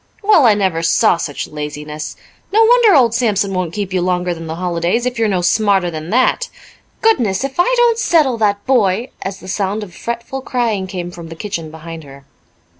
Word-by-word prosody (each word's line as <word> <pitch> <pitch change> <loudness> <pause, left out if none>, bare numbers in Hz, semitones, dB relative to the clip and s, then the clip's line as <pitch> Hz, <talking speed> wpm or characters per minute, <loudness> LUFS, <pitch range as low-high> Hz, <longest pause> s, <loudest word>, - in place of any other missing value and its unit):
"Well, 400 - +5
I 215 - +5
never 190 -5 0
saw 170 +3 +3
such 145 -4 -4
laziness! 150 0 -6 0.4
No 440 +3 +5
wonder 460 -4 +5
old 240 -5 +4
Sampson 205 -5 0
won't 185 -3 -2
keep 200 0 -4
you 185 - +1
longer 180 0 0
than 165 -1 -8
the 160 - -4
holidays 175 +6 -1
if 245 -2 -2
you're 225 - +2
no 190 -3 0
smarter 195 -1 +2
than 155 0 -6
that. 255 +5 +1 0.5
Goodness, 245 - +2
if 275 +4 -5
I 355 +8 +4
don't 475 -1 +3
settle 290 - +2
that 205 -2 0
boy!" 235 -2 +1
as 190 0 -5
the 185 - -12
sound 200 +2 -2
of 185 -4 -11
fretful 235 - -5
crying 230 -7 -1
came 180 -2 -5
from 170 -1 -10
the 165 - -8
kitchen 170 -3 -5
behind 160 +1 -9
her. 140 -1 -14
195 Hz, 195 wpm, -17 LUFS, 170-240 Hz, 0.5 s, Well